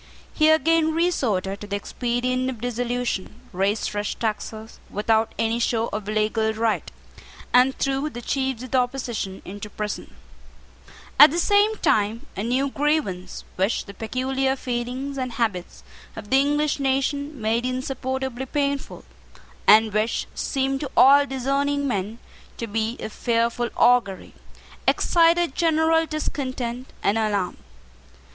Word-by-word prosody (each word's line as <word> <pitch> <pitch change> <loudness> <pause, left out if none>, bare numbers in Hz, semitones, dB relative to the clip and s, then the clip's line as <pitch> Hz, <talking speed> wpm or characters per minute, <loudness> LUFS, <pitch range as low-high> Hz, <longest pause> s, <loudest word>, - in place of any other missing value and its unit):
He 310 -1 +4
again 320 0 +3
resorted 220 - 0
to 205 - -7
the 200 - -2
expedient 250 +4 -1
of 250 -4 -6
dissolution, 245 -3 -3
raised 195 +4 0
fresh 205 0 -3
taxes 220 0 -4
without 220 +2 +1
any 225 +1 0
show 230 -1 0
of 210 -1 -4
legal 215 +1 +1
right, 225 0 -1 0.6
and 255 +2 +5
threw 275 +2 0
the 240 -4 -8
chiefs 265 -2 -1
of 255 - -9
the 260 - +4
opposition 245 -6 -3
into 205 +2 -7
prison 210 0 -5 1.0
At 295 - +11
the 330 - -3
same 410 +4 +3
time 220 - +1
a - - -3
new 260 +5 0
grievance, 280 -12 -1
which 190 +4 0
the 200 - -10
peculiar 265 +5 -1
feelings 255 +2 -4
and 255 -2 -3
habits 220 -7 -3 0.3
of 210 -1 -9
the 265 - +6
English 295 +1 +1
nation 280 +1 -1
made 225 +2 0
insupportably 260 0 -3
painful, 280 0 -2 0.6
and 215 0 +6
which 215 +2 0
seemed 270 -1 -1
to 285 - -4
all 280 +2 +7
discerning 280 +2 0
men 210 -2 -2 0.4
to 230 - -3
be 225 +2 -2
of 215 - -6
fearful 235 0 0
augury, 240 -6 +2 0.5
excited 340 -2 +3
general 325 0 +2
discontent 255 -5 -4
and 210 +3 +2
alarm. 205 -4 -1
245 Hz, 135 wpm, -23 LUFS, 220-275 Hz, 1.0 s, At